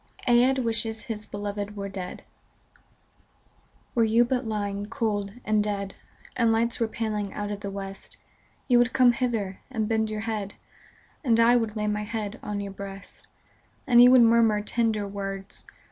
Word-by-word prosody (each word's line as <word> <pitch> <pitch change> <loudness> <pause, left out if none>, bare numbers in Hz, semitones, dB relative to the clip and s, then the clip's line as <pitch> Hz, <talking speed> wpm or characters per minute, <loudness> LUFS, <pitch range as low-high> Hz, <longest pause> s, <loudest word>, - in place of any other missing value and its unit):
58 240 - +4
AEDH 265 +2 +3
WISHES 225 -1 0
HIS 215 -2 -5
BELOVED 205 0 -5
WERE 200 -1 -4
DEAD 190 -2 -7 1.7
Were 230 - +3
you 225 +2 +4
but 250 -1 -1
lying 205 -1 -3
cold 205 -5 -2
and 215 -1 +2
dead. 200 -2 -3 0.4
And 230 -2 +3
lights 230 +1 +1
were 230 - +1
paling 215 -3 -3
out 205 0 -3
of 205 - -4
the 200 - -5
West, 195 0 -7 0.5
You 245 -2 +5
would 245 +1 +2
come 255 -2 +6
hither, 230 -6 -2
and 220 -5 -2
bend 220 -1 +1
your 215 0 -3
head, 215 -3 -4 0.7
And 230 -4 +3
I 235 +1 +6
would 225 -3 0
lay 210 -1 -1
my 210 0 -1
head 210 +1 -4
on 205 -1 -4
your 200 -1 -5
breast; 195 0 -10 0.6
And 240 -4 +6
you 245 - +9
would 255 -1 +7
murmur 225 -2 +4
tender 220 -2 0
words. 195 0 -5
215 Hz, 170 wpm, -26 LUFS, 205-230 Hz, 1.7 s, you